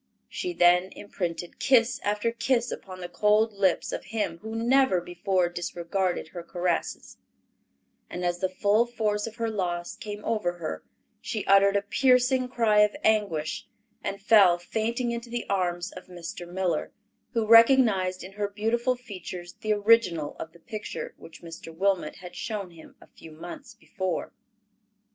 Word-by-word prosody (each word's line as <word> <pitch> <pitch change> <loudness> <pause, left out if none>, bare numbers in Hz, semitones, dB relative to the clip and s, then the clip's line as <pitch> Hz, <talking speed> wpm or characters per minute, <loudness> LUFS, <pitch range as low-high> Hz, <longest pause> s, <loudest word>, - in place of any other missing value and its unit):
She 360 - -3
then 180 - +5
imprinted 175 -4 -5
kiss 245 -2 +3
after 210 +3 0
kiss 235 +1 0
upon 185 -1 -8
the 175 - -4
cold 210 +4 +2
lips 195 -3 +1
of - - -5
him 200 -6 -3
who 220 +3 -7
never 240 -3 +3
before 175 +1 0
disregarded 175 0 -2
her 175 - -7
caresses; 175 0 -3 0.9
and 180 0 -4
as 175 0 0
the 185 - 0
full 205 +5 +2
force 215 -3 -1
of 225 - -8
her 230 -1 -2
loss 175 -4 -3
came 210 -3 -7
over 210 -6 0
her, 155 - -5 0.4
she - - -4
uttered 195 0 +5
a 200 - +2
piercing 250 +3 +3
cry 225 -4 +3
of 210 0 +4
anguish, 200 -8 0 0.4
and 200 - -3
fell 195 -4 +6
fainting 230 +7 -2
into 235 0 -5
the 240 0 -4
arms 180 -1 -1
of 185 - -11
Mr. 175 -1 -8
Miller, 180 -3 -1 0.4
who 230 -2 +1
recognized 225 -6 +5
in 185 - -9
her 205 +1 -2
beautiful 225 +5 0
features 185 -6 -8
the 215 - -1
original 205 -8 +3
of 160 - -6
the 170 - -19
picture 215 +4 -6
which 160 0 -14
Mr. 165 0 -9
Wilmot 185 -1 0
had 180 -2 -11
shown 205 -4 -4
him 165 -1 -15
a - - -16
few 165 - -14
months 280 - -10
before. 185 -3 -4
200 Hz, 155 wpm, -27 LUFS, 175-225 Hz, 0.9 s, fell